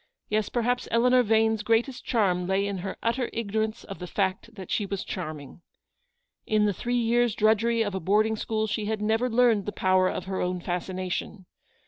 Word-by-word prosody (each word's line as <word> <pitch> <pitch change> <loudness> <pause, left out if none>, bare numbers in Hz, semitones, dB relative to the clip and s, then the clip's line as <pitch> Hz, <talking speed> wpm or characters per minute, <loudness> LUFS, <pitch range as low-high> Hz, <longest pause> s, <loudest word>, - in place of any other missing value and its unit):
Yes, 215 0 0
perhaps 245 +1 0
Eleanor 250 +2 +4
Vane's 220 -1 +2
greatest 230 +4 0
charm 180 -6 +1
lay 195 +1 +1
in 200 -2 -3
her 190 +1 -5
utter 235 +2 0
ignorance 220 0 -2
of 195 - -9
the 180 - -6
fact 195 +4 -2
that 190 -4 -9
she 210 - +1
was 195 -1 -3
charming. 155 -2 -7 0.9
In 215 -1 +3
the 205 - +1
three 245 +6 -2
years' 235 -1 +2
drudgery 225 +2 +3
of 205 -2 -3
a 190 - -2
boarding 215 +5 +2
school 220 0 -1
she 210 0 -2
had 215 0 -2
never 225 +4 +1
learned 230 -4 +3
the - - -1
power 185 -1 +2
of 185 - -4
her 190 0 -3
own 180 0 -1
fascination. 185 +2 -4
215 Hz, 185 wpm, -26 LUFS, 190-230 Hz, 0.9 s, Eleanor